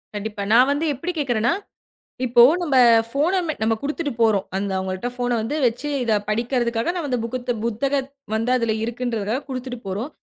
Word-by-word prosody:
கண்டிப்பா. 205 Hz, 0 st, -4 dB
நான் 255 Hz, +4 st, +6 dB
வந்து 295 Hz, +3 st, 0 dB
எப்படி 335 Hz, +8 st, -4 dB
கேக்குறேன்னா? 240 Hz, -2 st, +1 dB, 0.7 s
இப்போ, 240 Hz, 0 st, +6 dB, 0.2 s
நம்ம 285 Hz, -6 st, +1 dB, 0.3 s
ஃபோன் 300 Hz, +8 st, +1 dB
அ -, -, +2 dB, 0.2 s
நாம 225 Hz, 0 st, +2 dB
குடுத்துட்டு 295 Hz, 0 st, -2 dB
போறோம். 210 Hz, -4 st, +3 dB
அந்த 200 Hz, 0 st, -2 dB
அவங்கள்ட 190 Hz, +5 st, -3 dB
ஃபோன் 245 Hz, 0 st, -1 dB
அ -, -, +1 dB
வந்து 285 Hz, +7 st, -2 dB
வச்சு 245 Hz, +6 st, -2 dB, 0.2 s
இதை 225 Hz, -, +2 dB
படிக்கறதற்காக 235 Hz, +4 st, 0 dB
நாம 315 Hz, -5 st, -3 dB
அந்த 250 Hz, -, +1 dB
புகுத்த 245 Hz, +1 st, -2 dB
புத்தகத் 270 Hz, +4 st, -1 dB, 0.2 s
வந்து 225 Hz, +3 st, 0 dB
அதுல 230 Hz, -2 st, 0 dB
இருக்குன்றத 235 Hz, -2 st, -2 dB
குடுத்துட்டு 255 Hz, -1 st, -5 dB
போறோம். 205 Hz, +10 st, -3 dB
245 Hz, 170 wpm, -22 LUFS, 225-275 Hz, 0.7 s, நான்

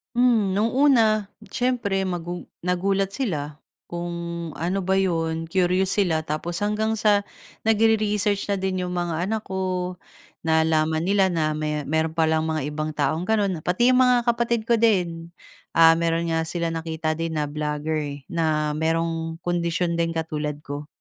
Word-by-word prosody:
Hmm. 230 Hz, -6 st, +3 dB
No'ng 215 Hz, +3 st, +1 dB
una 230 Hz, -6 st, +4 dB, 0.2 s
siyempre, 225 Hz, -7 st, 0 dB
magu 175 Hz, -1 st, -4 dB, 0.2 s
nagulat 195 Hz, +2 st, 0 dB
sila 150 Hz, -, -3 dB, 0.3 s
kung 170 Hz, -1 st, -5 dB
ano 175 Hz, +5 st, -1 dB
ba 190 Hz, 0 st, 0 dB
'yon, 165 Hz, -3 st, 0 dB
curious 185 Hz, +2 st, +1 dB
sila, 165 Hz, -5 st, +2 dB
tapos 165 Hz, +4 st, -4 dB
hanggang 215 Hz, +1 st, 0 dB
sa 205 Hz, -2 st, +2 dB, 0.4 s
nagre-research 210 Hz, -2 st, +2 dB
na 200 Hz, -, 0 dB
din 185 Hz, -1 st, -2 dB
'yong 180 Hz, -, -4 dB
mga 175 Hz, -1 st, -1 dB
anak 220 Hz, +1 st, -2 dB
ko. 185 Hz, -2 st, -3 dB, 0.5 s
Nalaman 160 Hz, 0 st, +2 dB
nila 195 Hz, +2 st, +3 dB
na 155 Hz, -2 st, +1 dB
me 150 Hz, 0 st, -2 dB
meron 160 Hz, +2 st, -1 dB
palang 160 Hz, -1 st, +2 dB
mga 160 Hz, -2 st, -1 dB
ibang 155 Hz, +1 st, -3 dB
taong 150 Hz, +4 st, 0 dB
gano'n. 200 Hz, -5 st, +1 dB
Pati 240 Hz, +8 st, +3 dB
'yong 255 Hz, -, +4 dB
mga 250 Hz, -1 st, +5 dB
kapatid 235 Hz, -1 st, +1 dB
ko 230 Hz, +1 st, +2 dB
din, 175 Hz, -7 st, +1 dB, 0.4 s
ah, 165 Hz, 0 st, +7 dB
mayro'n 165 Hz, 0 st, 0 dB
nga 160 Hz, 0 st, 0 dB
sila 170 Hz, 0 st, -2 dB
nakita 160 Hz, -1 st, -3 dB
din 165 Hz, -1 st, -2 dB
na 150 Hz, -2 st, -1 dB
blogger 150 Hz, +1 st, -2 dB
eh, 145 Hz, -1 st, -4 dB
na 155 Hz, -2 st, 0 dB
merong 165 Hz, +1 st, -1 dB
kondisyon 170 Hz, 0 st, 0 dB
din 165 Hz, 0 st, 0 dB
katulad 150 Hz, -2 st, -3 dB
ko. 145 Hz, 0 st, -6 dB
170 Hz, 155 wpm, -24 LUFS, 160-200 Hz, 0.5 s, ah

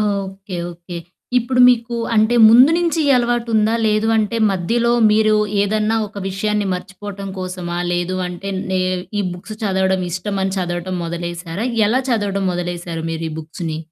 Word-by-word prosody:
Okay. 195 Hz, -2 st, -3 dB, 0.2 s
Okay. 170 Hz, 0 st, -8 dB, 0.4 s
ఇప్పుడు 250 Hz, +1 st, 0 dB
మీకు 235 Hz, -1 st, +1 dB, 0.2 s
అంటే 220 Hz, +2 st, +3 dB
ముందు 250 Hz, +6 st, +7 dB
నుంచి 340 Hz, -1 st, 0 dB
ఈ -, -, +3 dB
అలవాటుందా? 235 Hz, -2 st, +1 dB
లేదు 215 Hz, +1 st, +2 dB
అంటే 220 Hz, +1 st, 0 dB
మధ్యలో 230 Hz, +6 st, 0 dB, 0.2 s
మీరు 215 Hz, 0 st, +3 dB, 0.3 s
ఏదన్నా 215 Hz, +2 st, +1 dB
ఒక 205 Hz, -, -9 dB
విషయాన్ని 210 Hz, +2 st, -1 dB
మర్చిపోవటం 195 Hz, +1 st, -7 dB
కోసమా? 180 Hz, -2 st, -4 dB, 0.2 s
లేదు 175 Hz, +1 st, -1 dB
అంటే 180 Hz, +2 st, -6 dB, 0.2 s
నే 185 Hz, -1 st, +1 dB, 0.4 s
ఈ -, -, 0 dB
బుక్స్‌ 180 Hz, +5 st, -8 dB
చదవడం 190 Hz, -1 st, +1 dB
ఇష్టమని 190 Hz, +2 st, -2 dB
చదవటం 175 Hz, 0 st, -3 dB
మొదలేసారా? 170 Hz, +3 st, -4 dB, 0.2 s
ఎలా 240 Hz, +5 st, +2 dB
చదవటం 200 Hz, -4 st, 0 dB
మొదలేసారు 175 Hz, -2 st, -4 dB
మీరు 165 Hz, 0 st, -3 dB
ఈ -, -, -7 dB
బుక్స్‌ని? 160 Hz, 0 st, -5 dB
195 Hz, 140 wpm, -19 LUFS, 175-220 Hz, 0.4 s, ముందు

